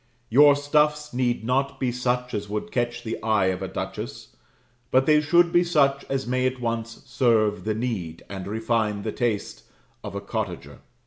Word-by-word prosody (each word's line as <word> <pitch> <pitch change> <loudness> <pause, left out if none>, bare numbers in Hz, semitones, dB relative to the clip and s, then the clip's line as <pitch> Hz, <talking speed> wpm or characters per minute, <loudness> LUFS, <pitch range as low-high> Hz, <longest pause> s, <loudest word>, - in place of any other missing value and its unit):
Your 145 +3 +7
stuffs 150 +1 +1
need 120 -2 0
not 135 +4 0
be 130 -2 0
such 125 0 -1
as 105 -1 -3
would 105 0 -4
catch 120 -1 -2
the 115 0 -4
eye 110 -3 +2
of 90 - -7
a 95 - -3
duchess; - - -6 0.5
but 130 +1 +3
they 150 0 +5
should 170 +3 +4
be 175 +1 +4
such 140 -5 +2
as 135 -1 -2
may 130 +1 +1
at 130 0 -3
once 115 -1 -4
serve 110 -5 +1
the 110 -1 0
need, 105 -9 -4
and 95 -1 -7
refine 110 -1 -1
the 110 - -2
taste, 115 -4 -2 0.4
of - - -7
a - - -3
cottager. - - -5
120 Hz, 180 wpm, -25 LUFS, 110-135 Hz, 0.5 s, Your